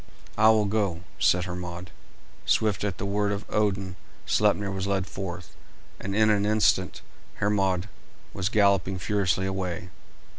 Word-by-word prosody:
"I 110 +1 +5
will 110 -1 +4
go," 100 -5 -1 0.2
said 90 0 +3
Hermod; 90 0 -6 0.5
swift 105 -4 +1
at 100 -4 -2
the - - -4
word 100 +1 0
of 100 0 -3
Odin 95 -3 -1 0.3
Sleipner 100 -1 +2
was 95 0 -3
led 95 -2 0
forth, 90 -3 -7 0.4
and 100 0 -4
in 110 0 +4
an 100 -1 +2
instant 105 -3 +1 0.3
Hermod 95 -2 0 0.5
was 95 +1 -1
galloping 100 -3 +2
furiously 95 -1 0
away. 95 -1 -3
100 Hz, 140 wpm, -26 LUFS, 90-105 Hz, 0.5 s, I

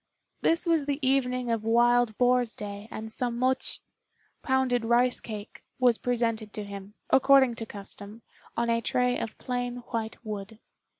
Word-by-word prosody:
This 330 +2 +2
was 325 -4 +2
the 285 -1 0
evening 250 -2 +1
of 225 -2 -1
Wild 240 0 +3
Boar's 245 -3 +3
day, 205 0 -7
and 220 -1 -6
some 240 +1 -1
mochi 260 +1 0 0.6
(pounded 260 -3 +1
rice 240 +2 +3
cake) 210 -1 -8 0.2
was 245 -3 +3
presented 230 -3 -1
to 210 - -4
him, 200 0 -9 0.2
according 270 -2 +6
to 225 - -5
custom, 205 +2 -7 0.3
on 235 0 +1
a 230 0 +1
tray 250 +2 +1
of 225 - -5
plain 245 -1 -3 0.2
white 225 -1 -3
wood. 210 0 -6
235 Hz, 155 wpm, -28 LUFS, 220-250 Hz, 0.6 s, according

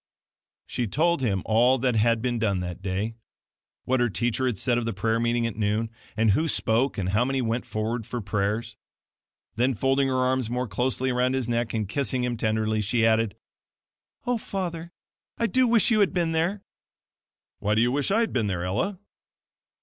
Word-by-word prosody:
She 120 - -2
told 165 - +1
him 100 -7 0
all 120 +4 +4
that 125 -1 +1
had 115 +1 +2
been 120 -2 0
done 100 -4 +1
that 90 0 -5
day 100 +4 -2 0.7
what 130 0 +1
her 120 -1 +2
teacher 120 +7 0
had 120 -6 -1
said 120 +3 +1
of 120 - -3
the 115 - -2
prayer 110 +4 0
meeting 120 0 +1
at 115 - -3
noon, 110 +1 0 0.3
and 110 -1 +4
who 155 +11 +2
spoke, 125 -2 +1
and 95 -2 -1
how 105 +5 +2
many 135 +1 0
went 120 0 -1
forward 110 +1 -3
for 125 - -4
prayers. 105 +2 -2 0.8
Then 125 +2 +2
folding 135 +4 +2
her 130 - 0
arms 130 -2 +1
more 125 +1 -2
closely 130 +6 -1
around 125 +1 +1
his 130 -3 -1
neck, 120 -1 -1
and 110 -2 -1
kissing 130 +2 -1
him 125 -1 -1
tenderly, 110 -1 0
she 110 +2 +1
added: 115 -1 +2 0.9
"Oh, 245 -1 0
father, 170 -5 -4 0.5
I 230 - +1
do 255 +2 +3
wish 230 0 +3
you 215 - +4
had 200 - +3
been 170 -2 +1
there!" 170 +5 0 1.0
"Why 105 +1 +1
do 110 - +3
you 120 - +2
wish 140 +2 0
I 215 +4 +3
had 230 - -1
been 115 -5 +1
there, 90 -3 -2
Ella?" 180 - -1
120 Hz, 195 wpm, -26 LUFS, 110-130 Hz, 1.0 s, all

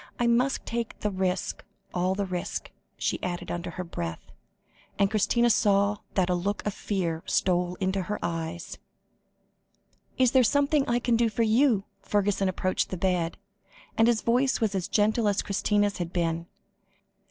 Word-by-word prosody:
I 240 - +2
must 245 +3 +2
take 235 -1 -4
the 210 - 0
risk 185 -1 -2 0.3
all 180 +1 +1
the 200 0 -1
risk," 180 -2 -4 0.3
she - - -1
added 175 -1 -4
under 175 +1 -4
her 180 +2 -5
breath, 85 - -6 0.7
and 200 0 +2
Christina 235 +3 +3
saw 200 0 +3 0.2
that 185 -2 +3
a 180 - +1
look 195 +4 -2
of 210 - -1
fear 175 -6 -2
stole 180 -1 +1
into 190 +1 -1
her 210 +3 -3
eyes. 165 0 -4 1.4
"Is 255 -2 +4
there 260 - +5
something 285 +3 +2
I 240 - +3
can 240 -1 +1
do 230 -1 +3
for 230 +2 0
you?" 225 -1 +3 0.2
Fergusson 200 -1 +1
approached 185 0 -1
the 185 - -4
bed, 175 -2 0 0.6
and 225 0 +4
his 235 -2 +2
voice 255 +3 +2
was 220 -4 0
as 190 -1 -1
gentle 215 +2 +2
as 205 -1 +1
Christina's 205 0 +1
had 175 -1 -3
been. 170 -1 -1
200 Hz, 165 wpm, -27 LUFS, 180-230 Hz, 1.4 s, there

